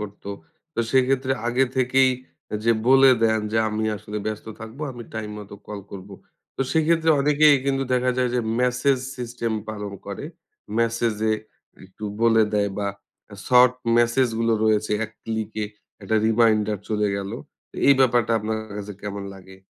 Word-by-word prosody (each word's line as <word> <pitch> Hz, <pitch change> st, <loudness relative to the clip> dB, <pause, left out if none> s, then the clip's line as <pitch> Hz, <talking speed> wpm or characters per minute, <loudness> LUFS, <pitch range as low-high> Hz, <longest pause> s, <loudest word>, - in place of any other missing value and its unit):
করত। 105 Hz, -1 st, -8 dB, 0.5 s
তো -, -, 0 dB
সেক্ষেত্রে 130 Hz, 0 st, +2 dB, 0.2 s
আগে 125 Hz, +2 st, +3 dB
থেকেই 130 Hz, +1 st, +4 dB, 0.5 s
যে 115 Hz, -, +5 dB, 0.2 s
বলে 135 Hz, 0 st, +7 dB
দেন 110 Hz, -1 st, +3 dB
যে 110 Hz, -, +2 dB
আমি 110 Hz, 0 st, -2 dB
আসলে 105 Hz, 0 st, -7 dB
ব্যস্ত 110 Hz, 0 st, -4 dB
থাকবো, 115 Hz, +6 st, -8 dB
আমি 120 Hz, -1 st, -8 dB
টাইম 110 Hz, -1 st, -4 dB
মতো 100 Hz, -1 st, -10 dB
কল 105 Hz, -1 st, -6 dB
করব। 95 Hz, 0 st, -9 dB, 0.5 s
তো -, -, -5 dB
সেক্ষেত্রে 160 Hz, 0 st, +3 dB
অনেকেই 150 Hz, +1 st, +5 dB
কিন্তু 135 Hz, -1 st, +1 dB
দেখা 125 Hz, 0 st, +2 dB
যায় 125 Hz, -1 st, +2 dB
যে 125 Hz, -, +2 dB, 0.2 s
মেসেজ 125 Hz, +2 st, +2 dB, 0.2 s
সিস্টেম 120 Hz, -2 st, -3 dB, 0.2 s
পালন 105 Hz, -2 st, -5 dB
করে। 100 Hz, +7 st, -6 dB, 0.5 s
মেসেজ 115 Hz, -1 st, +1 dB, 0.2 s
এ -, -, +3 dB, 0.5 s
একটু 95 Hz, +3 st, -11 dB, 0.2 s
বলে 115 Hz, -1 st, +5 dB
দেয় 100 Hz, -1 st, +1 dB
বা 100 Hz, -1 st, -1 dB, 0.6 s
শর্ট 125 Hz, 0 st, +6 dB, 0.3 s
মেসেজ 120 Hz, +2 st, +3 dB
গুলো 115 Hz, 0 st, +2 dB
রয়েছে 110 Hz, -1 st, +2 dB
এক 110 Hz, -, -9 dB
ক্লিকে 110 Hz, -1 st, -3 dB, 0.4 s
একটা 110 Hz, +3 st, 0 dB
রিমাইন্ডার 110 Hz, -2 st, +3 dB
চলে 105 Hz, -1 st, +1 dB
গেল। 100 Hz, 0 st, -4 dB, 0.6 s
এই 140 Hz, -, +8 dB
ব্যাপারটা 120 Hz, -3 st, +3 dB
আপনার 110 Hz, +1 st, -2 dB, 0.2 s
কাছে 105 Hz, 0 st, -6 dB
কেমন 100 Hz, -1 st, -5 dB
লাগে? 95 Hz, 0 st, -14 dB
115 Hz, 155 wpm, -23 LUFS, 105-125 Hz, 0.6 s, এই